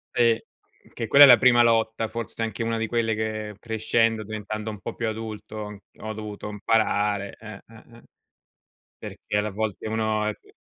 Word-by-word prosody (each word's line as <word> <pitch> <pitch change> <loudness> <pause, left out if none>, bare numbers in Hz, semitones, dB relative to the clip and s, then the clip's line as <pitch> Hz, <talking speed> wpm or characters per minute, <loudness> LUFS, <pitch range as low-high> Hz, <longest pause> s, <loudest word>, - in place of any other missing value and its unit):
Sì, 115 -2 +4 0.5
che 115 - -4
quella 140 +6 +8
è - - +11
la 120 -2 +9
prima 120 -2 +6
lotta, 115 -1 +2
forse 115 0 -5
anche 115 +1 -4
una 115 0 -1
di 115 - -1
quelle 115 -1 0
che 110 -1 -4
crescendo, 115 0 0
diventando 110 0 -5
un 105 -2 -7
po' - - -6
più 115 - -3
adulto, 110 -1 -6
ho 110 0 -7
dovuto 105 -1 -7
imparare, 105 -1 0
eh, 110 -1 -9
eh, 115 -1 -16
eh. - - -18 0.9
Perché - - -7
alle 105 +1 -1
volte 110 +1 -3
uno 110 -1 0
è 105 - -1
c - - -24
110 Hz, 175 wpm, -25 LUFS, 105-115 Hz, 0.9 s, è